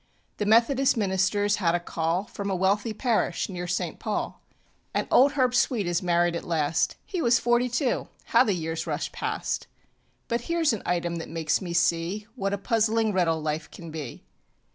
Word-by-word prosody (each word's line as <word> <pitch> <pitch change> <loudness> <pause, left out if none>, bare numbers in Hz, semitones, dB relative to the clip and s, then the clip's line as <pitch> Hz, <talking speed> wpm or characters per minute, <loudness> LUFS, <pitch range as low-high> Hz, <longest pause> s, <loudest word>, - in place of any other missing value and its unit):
The 210 - -1
methodist 240 +5 +4
ministerŌĆÖs 205 0 +1
had 175 -4 +2
a - - +1
call 170 +1 -1
From 200 -1 -6
a 190 - 0
wealthy 200 +4 +1
parish 215 -6 0
near 180 -2 -5
St. 175 - -2
Paul. - - -3 0.5
And - - 0
old 280 +3 +6
Herb 255 -3 +2
Sweet 245 -4 +2
is 175 0 0
married 175 -1 +2
at 170 - -4
last 160 -1 0
He 365 -4 -3
was 235 -4 +4
forty 240 +1 +2
two. 245 +2 0 0.2
How - - +5
the 205 - +1
years 165 -1 -3
rush - - -2
past! - - -3 0.6
But 235 0 -1
hereŌĆÖs 330 -1 +1
an 220 - -3
item 175 -1 0
that 165 - -6
makes 160 -1 0
me 175 -3 -4
see 170 +4 +1
What 195 -2 -2
a 200 - 0
puzzling 220 +1 +1
riddle 165 -4 +1
life 155 +1 -2
can 170 -2 -10
be. 150 -6 -7
190 Hz, 185 wpm, -26 LUFS, 170-230 Hz, 0.6 s, old